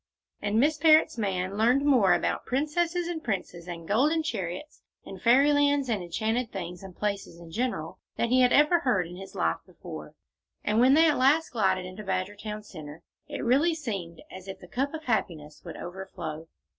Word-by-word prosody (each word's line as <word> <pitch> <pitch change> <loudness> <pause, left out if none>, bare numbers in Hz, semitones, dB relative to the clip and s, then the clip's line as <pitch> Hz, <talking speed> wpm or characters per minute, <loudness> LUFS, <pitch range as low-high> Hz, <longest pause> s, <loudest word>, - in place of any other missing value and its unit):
And 210 +2 +1
Miss 300 +4 +3
Parrott's 315 -6 +5
man 195 -1 -2
learned 250 +5 +3
more 235 -11 +5
about - - -2
princesses 335 +6 0
and 335 -2 -4
princes 180 -5 -4
and 170 -2 -7
golden 295 +10 +2
chariots 205 - -5 0.2
and 190 -1 -9
Fairyland 285 +2 +4
and 215 -4 0
enchanted 220 +7 -2
things 180 -2 -6
and 190 -2 -11
places 200 -4 -3
in 170 -1 -12
general 215 -6 -3 0.2
than 235 - 0
he 255 +1 +4
ever 295 +7 +5
heard 240 - +1
in 175 +1 -9
his 190 0 -10
life 80 0 0
before, - - -10 0.5
and 210 +2 +1
when 260 +4 +6
at 320 -3 +4
last 295 +5 +4
they - - -28
glided 190 -5 +1
into 185 +3 -8
Badgertown 205 +3 -4
Centre, 155 -4 -10 0.2
it - - -5
really 290 +8 +3
seemed 195 - -5
as 185 +1 -10
if 190 - -6
the 180 - -13
cup 275 - -2
of 315 - -7
happiness 165 - -2
would 170 - -8
overflow. 170 -4 -7
215 Hz, 180 wpm, -27 LUFS, 180-280 Hz, 0.5 s, when